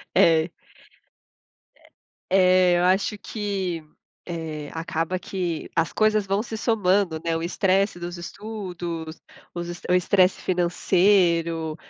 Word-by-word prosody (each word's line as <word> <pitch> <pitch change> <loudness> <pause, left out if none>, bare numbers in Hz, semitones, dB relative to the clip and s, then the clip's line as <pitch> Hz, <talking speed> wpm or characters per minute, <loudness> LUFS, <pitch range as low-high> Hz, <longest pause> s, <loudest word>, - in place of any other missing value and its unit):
É. 165 0 +4 1.3
É. - - -24 0.8
É 175 - +3
eu - - +1
acho 195 +3 +2
que, 195 -6 -3 0.4
eh, 160 -4 -5
acaba 165 +2 -2
que 180 -4 -4
as 165 -3 +1
coisas 215 -1 +2
vão 195 +2 0
se 230 - -6
somando, 200 -7 +1
né, 165 -1 0
o 165 - -2
estresse 190 +1 +1
dos 175 +1 -6
estudos, 175 -4 -6 0.4
os 175 0 -4
estre 175 +1 -5
o - - +6
estresse 185 +1 +3
financeiro, 175 -3 +2
175 Hz, 120 wpm, -24 LUFS, 165-195 Hz, 1.3 s, o